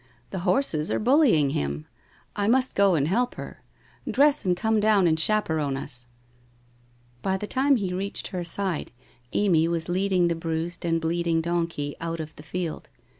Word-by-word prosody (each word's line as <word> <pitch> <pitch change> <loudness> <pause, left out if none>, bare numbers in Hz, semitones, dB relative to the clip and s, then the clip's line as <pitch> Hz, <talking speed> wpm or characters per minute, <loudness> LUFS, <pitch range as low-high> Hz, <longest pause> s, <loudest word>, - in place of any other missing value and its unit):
The 190 - -3
horses 170 - +3
are - - 0
bullying 230 - +4
him. 70 - -3 0.5
I 205 0 0
must 255 +3 +2
go 200 -3 +4
and 145 -2 +1
help 240 +8 0
her. - - -9 0.5
Dress 285 -5 +3
and 180 -1 +2
come 220 +2 +1
down 210 -3 +4
and 160 -1 +2
chaperon 160 -7 +1
us! 125 -2 -6 1.1
'■ - - -33
By 190 +5 0
the 210 - -5
time 270 +5 +2
he 195 -6 -2
reached 195 +2 -3
her 180 -2 -4
side, 175 -1 -3 0.4
Amy 170 -6 +3
was 170 0 -2
leading 185 -1 +2
the 170 - +1
bruised 165 +1 -3
and 165 -1 +1
bleeding 165 0 0
donkey 165 -3 -2
out 165 0 -3
of 155 0 -7
the - - -11
field. 165 +1 -5
175 Hz, 175 wpm, -25 LUFS, 160-205 Hz, 1.1 s, bullying